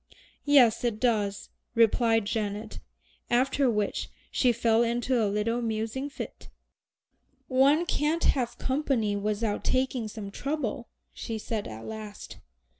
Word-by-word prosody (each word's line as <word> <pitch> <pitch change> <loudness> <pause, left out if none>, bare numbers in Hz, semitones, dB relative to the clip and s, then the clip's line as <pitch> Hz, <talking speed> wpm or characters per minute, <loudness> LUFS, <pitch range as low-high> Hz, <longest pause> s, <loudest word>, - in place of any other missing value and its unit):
"Yes, 250 -6 +5
it 230 -3 0
does," 210 -5 0 0.3
replied 225 -1 +3
Janet, 210 0 -3 0.5
after 260 +2 +2
which 210 -3 -1 0.2
she 250 - +3
fell 230 -1 +2
into 240 +1 +1
a 205 - +1
little 220 +4 0
musing 225 +4 -2
fit. 285 - -8 1.0
"One 280 +6 +4
can't 315 +1 0
have 245 -4 +1
company 260 -6 0
without 210 +1 -1
taking 255 -3 0
some 210 -2 -7
trouble," 255 -2 -3 0.3
she 225 - -5
said 215 -1 -3
at 110 0 -8
last. 215 -1 -8
230 Hz, 120 wpm, -28 LUFS, 215-260 Hz, 1.0 s, Yes